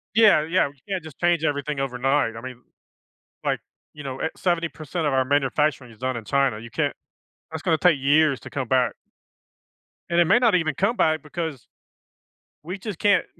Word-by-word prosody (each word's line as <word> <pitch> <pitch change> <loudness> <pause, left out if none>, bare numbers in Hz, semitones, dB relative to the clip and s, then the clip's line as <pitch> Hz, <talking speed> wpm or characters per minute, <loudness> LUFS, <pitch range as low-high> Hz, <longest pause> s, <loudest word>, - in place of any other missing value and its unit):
Yeah, 215 -8 +6
yeah, 165 -1 +2
we 140 - -17
can't 190 -3 -2
just 160 -3 -12
change 175 -2 +2
everything 145 -1 -1
overnight. 135 -2 0
I - - -6
mean, 125 0 -9 0.8
like, - - +1 0.3
you 150 -1 -10
know, 135 -1 -5
eh - - 0
70% 170 -2 -2
of 145 - 0
our 130 -1 +2
manufacturing 140 -2 +1
is 110 - -18
done 130 -1 -2
in 110 - -8
China. 135 -3 +1
You 120 - -10
can't - - 0 0.6
that's 160 -1 -6
gonna 165 -4 +2
take 175 -6 +4
years 145 0 +3
to - - -10
come 130 -4 -3
back. 125 -4 +2 1.2
And 170 - +3
it 170 - +6
may 195 +8 +5
not 230 -5 +3
even 160 -5 +1
come 200 - +1
back 155 -4 +2
because 155 -4 -5 1.0
we 180 +5 -5
just 200 -2 -6
can't 205 -2 +3
150 Hz, 190 wpm, -24 LUFS, 130-170 Hz, 1.2 s, Yeah